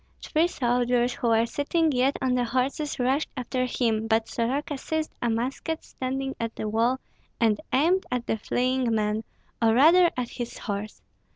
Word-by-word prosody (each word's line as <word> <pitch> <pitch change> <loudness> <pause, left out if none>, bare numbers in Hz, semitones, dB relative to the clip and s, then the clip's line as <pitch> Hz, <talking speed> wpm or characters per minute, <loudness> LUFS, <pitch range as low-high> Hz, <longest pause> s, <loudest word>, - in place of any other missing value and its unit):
Three 325 +2 +2
soldiers 245 -4 +1
who 240 - -2
were 225 0 +4
sitting 310 +6 0
yet 260 +1 +2
on 255 -1 +2
the 250 -1 +2
horses 260 +5 -1
rushed 265 +4 +1
after 255 0 -1
him; 225 -3 0
but 225 0 +2
Soroka 270 +6 -1
seized 315 +2 -3
a 240 - +1
musket 260 +8 -2
standing 270 +1 -4
at 230 -1 -3
the 215 - -3
wall, 230 +4 +1 0.4
and 225 0 +2
aimed 340 +8 +2
at 250 -1 -2
the 220 - -1
fleeing 250 +1 0
man, 215 0 0 0.4
or 225 -1 +4
rather 340 +7 +6
at 245 -1 -2
his 240 -1 -6
horse. 205 0 -5
250 Hz, 170 wpm, -26 LUFS, 230-275 Hz, 0.4 s, rather